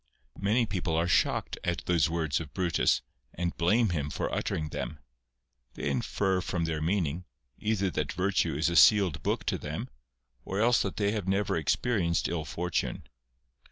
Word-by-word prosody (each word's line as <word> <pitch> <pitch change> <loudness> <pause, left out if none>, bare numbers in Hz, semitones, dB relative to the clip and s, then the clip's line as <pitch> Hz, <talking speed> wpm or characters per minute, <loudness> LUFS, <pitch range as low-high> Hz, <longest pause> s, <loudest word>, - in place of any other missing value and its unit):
Many 110 +5 +2
people 90 -6 -2
are 85 +2 +1
shocked 90 - +1
at - - -2
those 85 -4 +2
words 80 -5 0
of 75 -4 -9
Brutus, 90 -2 +2 0.3
and 85 -1 -2
blame 105 +7 +3
him 75 -5 -1
for - - -3
uttering 75 -1 -2
them. - - -5 0.8
They 70 - -2
infer 95 +8 0
from 85 -2 -2
their 80 -1 -2
meaning, 85 -1 -1 0.3
either 105 -3 0
that 75 -3 -2
virtue 95 -5 +1
is 75 +4 +1
a 85 - 0
sealed 90 -6 +6
book - - -1
to - - -1
them, - - -5 0.5
or 95 +8 -3
else 120 +2 +4
that 95 - -3
they 100 -1 +1
have 105 -4 -3
never 95 +1 +1
experienced 85 - +1
ill 85 -2 -3
fortune. 90 +1 -3
90 Hz, 165 wpm, -29 LUFS, 80-100 Hz, 0.8 s, sealed